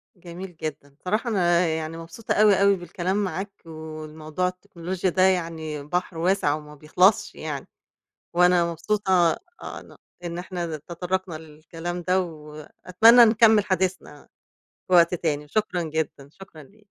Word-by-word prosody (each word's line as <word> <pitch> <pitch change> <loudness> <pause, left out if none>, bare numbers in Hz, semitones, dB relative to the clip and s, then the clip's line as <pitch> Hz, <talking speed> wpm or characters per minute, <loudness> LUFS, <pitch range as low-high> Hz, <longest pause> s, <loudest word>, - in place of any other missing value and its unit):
جميل 180 0 -10
جدًا، 155 -2 -6
الصراحة 205 - -3
أنا 175 -4 +2
يعني 160 0 -3
مبسوطة 165 +7 -5
أوي، 205 -2 +4
أوي 200 0 +5
بالكلام 185 +3 -2
معاك، 190 +2 -4
والموضوع 155 +1 -5
التكنولوجيا 180 0 -4
ده 185 +1 0
يعني 165 -5 0
بحر 175 +2 -3
واسع 175 -3 +1
وما 150 -1 -10
بيخلصش 180 +7 +2
يعني 145 -3 -6 0.7
وأنا 175 -1 +4
مبسوطة 195 +4 -2 0.5
آآ - - -7
ن - - -16 0.3
إن 170 0 -4
إحنا 175 -3 -4
تطرّقنا 180 +3 -4
للكلام 165 +3 -7
ده 185 +2 +1
وأتمنى 175 +8 +3
نكمِّل 220 -1 +5
حديثنا 185 -6 -2 0.6
في 185 - -1
وقت 170 0 +6
تاني، 150 -3 -2
شكرًا 210 0 -1
جدًا، 155 -3 -4
شكرًا 165 -4 -14
ليك. 210 +9 -22
175 Hz, 135 wpm, -24 LUFS, 155-190 Hz, 0.7 s, وقت